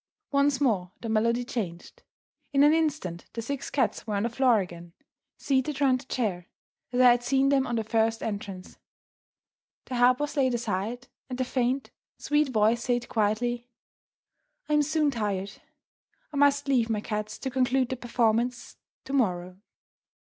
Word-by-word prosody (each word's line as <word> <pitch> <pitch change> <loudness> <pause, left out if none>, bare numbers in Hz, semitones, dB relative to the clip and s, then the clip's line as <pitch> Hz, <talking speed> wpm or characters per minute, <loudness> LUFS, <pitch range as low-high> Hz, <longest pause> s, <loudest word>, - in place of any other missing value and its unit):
Once 280 -1 +2
more 200 -10 +1
the 230 - -5
melody 230 +2 +2
changed. 190 -10 -5 0.5
In 275 0 +5
an 295 +1 +6
instant 275 - -1
the 230 - -4
six 280 +3 -4
cats 240 -4 -1
were 210 - -1
on 200 - 0
the 235 - 0
floor 245 -2 +3
again, 175 -2 -7 0.4
seated 275 +1 0
round 265 -3 +3
the - - -16
chair 190 -8 -2 0.4
as 250 - -1
I 250 -1 +8
had 240 0 +2
seen 270 +2 +2
them 270 -1 +2
on 240 - -2
their 225 - 0
first 225 0 0
entrance; 200 -3 -6 1.1
the 250 - -4
harp 245 +1 +5
was 295 0 -3
laid 260 -4 +2
aside; 230 +2 -3 0.2
and 250 - -4
the 255 - +1
faint, 255 +1 -1 0.3
sweet 295 0 +1
voice 225 0 +2
said 245 -1 -1
quietly, 240 +3 0 1.0
"I 300 - -1
am 300 - +5
soon 300 0 +1
tired 205 -5 -2 0.8
I - - -3
must 285 0 +3
leave 245 -4 +2
my 215 -2 0
cats 215 0 -4
to 265 - -4
conclude 255 0 +1
their 260 - -3
performances 240 0 0 0.3
tomorrow." 185 -9 -1
245 Hz, 165 wpm, -27 LUFS, 215-270 Hz, 1.1 s, I